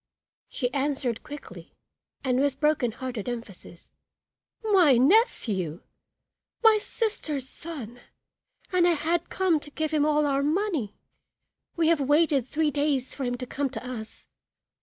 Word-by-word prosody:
She 250 -2 -2
answered 270 -4 -1
quickly 290 -1 -11 0.5
and 255 -1 +1
with 275 -1 +1
broken 300 -6 +2
hearted 245 -2 -5
emphasis 210 -7 -9 0.7
"My 365 - +5
nephew! 235 - +2 0.8
my 440 -1 +7
sister's 310 - -2
son, 260 -7 -8 0.7
and 360 -1 +4
I 350 - +4
had 335 +2 -1
come 365 -5 +2
to 295 - -9
give 310 +1 -3
him 305 -2 +2
all 300 0 +3
our 275 -1 +1
money. 310 - -1 0.8
We 330 -1 +2
have 330 -3 +3
waited 290 -2 +3
three 305 +1 0
days 285 -3 0
for 275 - -4
him 245 0 -1
to 250 - -5
come 275 +2 -2
to 240 +1 -7
us. 225 -3 -7
285 Hz, 140 wpm, -26 LUFS, 250-320 Hz, 0.8 s, my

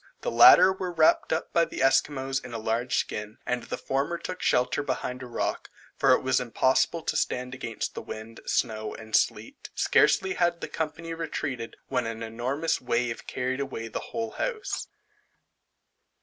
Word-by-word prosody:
The - - -2
latter 175 +11 +8
were 185 -1 -4
wrapt 160 -2 +3
up 160 - -2
by 170 - +4
the 150 - -3
Esquimaux 135 0 +2
in 120 - -9
a - - -2
large 115 +3 -1
skin, 105 +1 -3
and 125 0 -1
the - - -5
former 140 +6 -1
took 185 +1 -6
shelter 125 +3 +2
behind 125 -2 -3
a 125 - -7
rock, 120 - -3 0.3
for - - +3
it - - +2
was 130 0 +2
impossible 130 +6 +1
to - - -1
stand 125 +1 -1
against 120 -4 -4
the - - -5
wind, 110 +1 -8
snow, 110 -2 -1
and 110 -1 -4
sleet. - - 0
Scarcely 190 0 +3
had 175 -1 +1
the - - -5
company 165 +1 -4
retreated, 145 -7 -4
when 125 -3 -1
an 115 0 -5
enormous 130 +9 -1
wave 120 -1 -1
carried 130 +1 -2
away 130 -5 -4
the - - -4
whole 225 -1 -3
house. 450 - -3
130 Hz, 170 wpm, -27 LUFS, 115-165 Hz, 0.3 s, latter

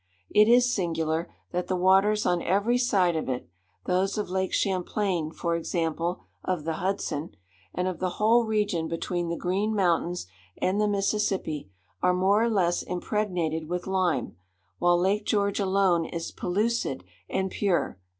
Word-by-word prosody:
It 210 0 +6
is 245 +1 +5
singular, 165 -2 -1 0.2
that 180 0 -2
the 185 - 0
waters 195 +4 +3
on 175 -1 +2
every 215 +6 +2
side 190 -8 +2
of 155 - -2
it,—those 125 - -3
of 210 -4 -3
Lake 190 0 0
Champlain, 185 -3 0
for 170 +1 -2
example, 170 +1 -2 0.2
of 180 -5 -2
the 160 0 -2
Hudson, 180 -5 -2 0.4
and 180 - 0
of 185 -2 -3
the 180 -1 -1
whole 230 +3 +4
region 210 -7 0
between 170 +1 -2
the 170 - -2
Green 200 +5 0
Mountains 175 - +1 0.3
and 195 +3 +1
the 210 - +3
Mississippi,—are 180 - -1
more 195 +4 +3
or 235 - +2
less 180 -5 +1
impregnated 175 -5 -2
with 180 0 -2
lime, 185 - 0 0.4
while 175 0 +4
Lake 200 +4 +1
George 200 -1 +1
alone 190 -4 +2
is 165 0 -5
pellucid 210 - -1 0.3
and 190 0 -1
pure. 185 - 0
185 Hz, 150 wpm, -27 LUFS, 170-200 Hz, 0.4 s, It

